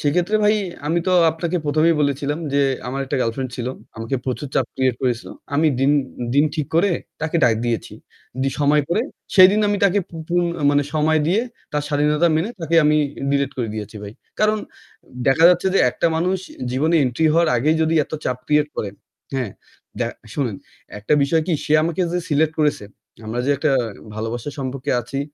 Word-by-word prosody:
সেক্ষেত্রে 175 +8 +1
ভাই 210 +1 +5 0.3
আমি 165 +3 +1
তো 185 - +2 0.2
আপনাকে 165 +2 -2
১ম 150 +2 +1
এই - - +3
বলেছিলাম 145 +1 0
যে, 140 - +3 0.3
"আমার 135 +2 -3
একটা 130 - -2
girlfriend 125 +3 -2
ছিল। 120 -1 -4 0.3
আমাকে 115 +4 -3
প্রচুর 130 +2 -3
চাপ 130 - +2
create 130 -2 +1
করেছিল।" 125 -2 -1 0.3
আমি 155 +2 +3
দিন 135 +2 +4 0.4
দিন 145 - +5
ঠিক 150 -3 -2
করে 185 +4 +3 0.3
তাকে 160 +1 -1
ডাক 115 -2 +4
দিয়েছি। 115 -2 -2 0.5
দি 135 - +2
সময় 145 +1 +4
করে, 210 +7 +1 0.3
সেদিন 195 +2 +7
আমি 205 - +1
তাকে 200 +1 +3
পু 165 - -9
পুন 175 0 +2 0.2
আ - - -3
মানে 145 0 +3
সময় 155 0 +2
দিয়ে 195 +6 +2 0.3
তার 150 0 0
স্বাধীনতা 150 +3 +2
মেনে 170 +8 -1
তাকে 165 0 -2
আমি 150 0 +4 0.3
delete 140 0 0
করে 120 -3 -2
দিয়েছি 105 0 -6
ভাই। 100 0 -7 0.3
কারণ 215 0 +3 0.7
দেখা 150 +5 +4
যাচ্ছে 180 +1 +3
যে - - +4
একটা 170 - 0
মানুষ 185 +3 0 0.3
জীবনে 155 +6 +2
entry 130 +6 +1
হওয়ার 170 0 +3
আগেই 155 +7 +2
যদি 160 +1 +1
এত - - -23
চাপ 125 0 -1
create 150 0 +2
করে, 100 - -3 0.4
হ্যাঁ? 125 -6 -2 0.5
দ্য - - 0 0.3
শোনেন, 120 -9 -1 0.4
একটা 105 - -2
বিষয় 160 +3 +2
কি? 180 - 0
সে 150 - -1
আমাকে 170 +2 -1
যে 180 - 0
select 155 +1 +2
করেছে, 150 -8 +1 0.4
আমরা 120 +3 -2
যে 145 - +2
একটা 150 +1 +1 0.4
ভালোবাসার 115 +6 -4
সম্পর্কে 130 -1 -3
আছি, 135 +4 -4
150 Hz, 185 wpm, -21 LUFS, 130-165 Hz, 0.7 s, সেদিন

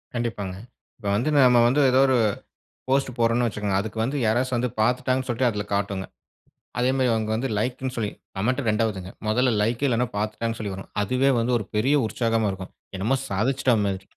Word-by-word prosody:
கண்டிப்பாங்க. 110 -6 -3 0.4
இப்போ 105 -4 -4
வந்து 120 +9 0
நம்ப 125 -3 +6
வந்து 135 +5 +3
ஏதோ 130 - +4
ஒரு 130 -1 +3 0.7
போஸ்ட் 135 0 +2
போடுறோம்னு 115 +1 +2
வச்சிக்கோங்க. 105 -3 -1
அதுக்கு 110 +2 -6
வந்து 135 +5 -2
யாராச்சும் 125 +3 +1
வந்து 125 +1 -1
பாத்துட்டாங்கன்னு 130 +3 +1
சொல்லிட்டு 120 +1 +1
அதுல 105 -2 -3
காட்டுங்க. 100 -1 -2 0.7
அதே 125 +1 +2
மாதிரி 130 -2 +2
அவங்க 110 -1 -1
வந்து 130 +4 -2
லைக்னு 125 +3 -2
சொல்லி, 105 -3 -1 0.3
கமெண்ட் 125 +8 0
ரெண்டாவதுங்க. 105 -4 -1 0.2
மொதல 125 +3 +2
லைக் 115 +5 0
இல்லன்னா, 125 -1 +1
பாத்துட்டாங்கன்னு 110 +2 -2
சொல்லி 105 -3 -4
வரும். 95 - -10
அதுவே 130 +6 +2
வந்து 115 +2 0
ஒரு 105 - -5
பெரிய 130 +8 +3
உற்சாகமா 115 -1 0
இருக்கும். 95 -1 -8 0.2
என்னமோ 110 +8 +1
சாதிச்சிட்டா 125 +5 +1
மாதிரி. 95 -1 -2
115 Hz, 175 wpm, -24 LUFS, 105-125 Hz, 0.7 s, நம்ப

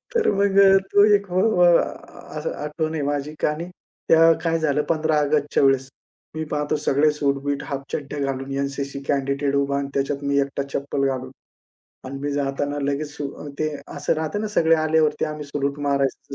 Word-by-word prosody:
तर 460 - +3
मग 200 0 +2
अ, 195 0 +7 0.2
तो 205 - +7
एक 200 0 -2
हो 185 +1 +2 0.2
अ, 175 - +7 0.7
असं - - -3
आठवण 155 +1 -3
आहे 155 - -2
माझी. 145 +1 -2
आणि 155 +4 -3 0.4
तेव्हा 165 0 +7
काय 165 0 +1
झालं 150 -2 +1
15 155 -1 +1
ऑगस्टच्या 145 -1 +1
वेळेस 135 -1 +3 0.5
मी 160 - -2
पाहतो 150 0 0
सगळे 150 +2 +3
सूट-बीट 140 -1 -1
हाफ 140 -1 -5
चड्ड्या 145 0 -4
घालून 135 +1 -6
एन-सी-सी 140 0 -3
कॅंडिडेट 140 0 0
उभा 140 0 +1
आणि 140 0 -2
त्याच्यात 140 +1 -1
मी 140 0 +1
एकटा 140 0 -2
चप्पल 140 0 -1
घालून. 130 -1 -3 0.7
आणि 135 +1 -6
मी 145 +1 -2
जाताना 145 +1 -2
लगेच 145 +1 -2 0.4
ते 155 - 0 0.3
असं 145 0 0
राहतं 160 +5 -2
ना, 215 - -2
सगळे 165 -5 +3
आल्यावरती 155 -1 +2
आम्ही 150 -1 -5
सॅलुट 140 0 -3
मारायचं 140 -1 -1
145 Hz, 175 wpm, -23 LUFS, 140-155 Hz, 0.7 s, अ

